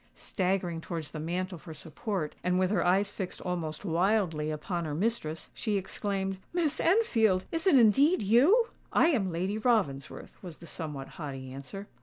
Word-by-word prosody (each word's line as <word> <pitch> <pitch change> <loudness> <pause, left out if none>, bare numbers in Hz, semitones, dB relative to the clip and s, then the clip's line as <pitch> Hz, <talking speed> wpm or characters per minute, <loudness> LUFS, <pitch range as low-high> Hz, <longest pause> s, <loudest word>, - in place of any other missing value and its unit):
Staggering 180 -3 -1
towards 165 -3 -5
the 155 - -6
mantel 180 +3 -3
for 160 0 -10
support, 160 +2 -4
and 180 0 +2
with 185 0 +2
her 195 -5 +2
eyes 195 +3 +2
fixed 190 -3 -5
almost 170 -1 -4
wildly 175 -3 +1
upon 170 +3 -3
her 150 -2 -3
mistress, 170 -5 -2
she 215 -3 -1
exclaimed, 195 0 -3
"Miss 325 -4 0
Enfield! 225 - +3
Is 330 +3 -1
it 300 - +7
indeed 265 - +5
you?" 295 - +5 0.2
"I 325 - +5
am 210 - +1
Lady 185 +6 -1
Ravensworth," 195 - -1
was 175 -4 -8
the 170 - -12
somewhat 150 -5 -6
haughty 135 -4 -7
answer. 140 +9 -7
185 Hz, 165 wpm, -29 LUFS, 160-215 Hz, 0.2 s, it